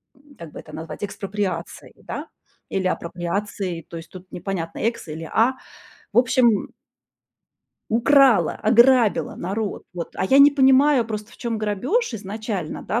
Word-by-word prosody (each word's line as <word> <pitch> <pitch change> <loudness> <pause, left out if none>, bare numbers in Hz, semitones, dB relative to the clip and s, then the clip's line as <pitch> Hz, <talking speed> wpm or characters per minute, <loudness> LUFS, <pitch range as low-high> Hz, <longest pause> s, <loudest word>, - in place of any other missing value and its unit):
м, 285 +1 -21
как 165 -3 -10
бы - - -8
это 155 - -13
назвать, 160 +5 -7
экспроприацией, 200 -1 -4
да, - - -6 0.4
или 190 -1 -1
апроприацией. 180 0 -3
То 170 - -7
есть 165 0 -10
тут 185 0 -13
непонятно, 175 -3 -5
"экс" 230 -4 -2
или 160 +2 -6
"а". 245 +4 +3 0.6
В 220 - +3
общем 245 -3 +3 1.2
украла, 240 - +4
ограбила 235 0 +4
народ. 200 +4 -4
Вот. 170 -2 -5
А - - -1
я 270 - +5
не 280 +1 +9
понимаю 270 -2 +4
просто, 215 0 -6
в - - -16
чём 235 -2 -2
грабёж 225 - -1
изначально, 205 -4 -5
да, 230 - -1
215 Hz, 150 wpm, -22 LUFS, 185-250 Hz, 1.2 s, не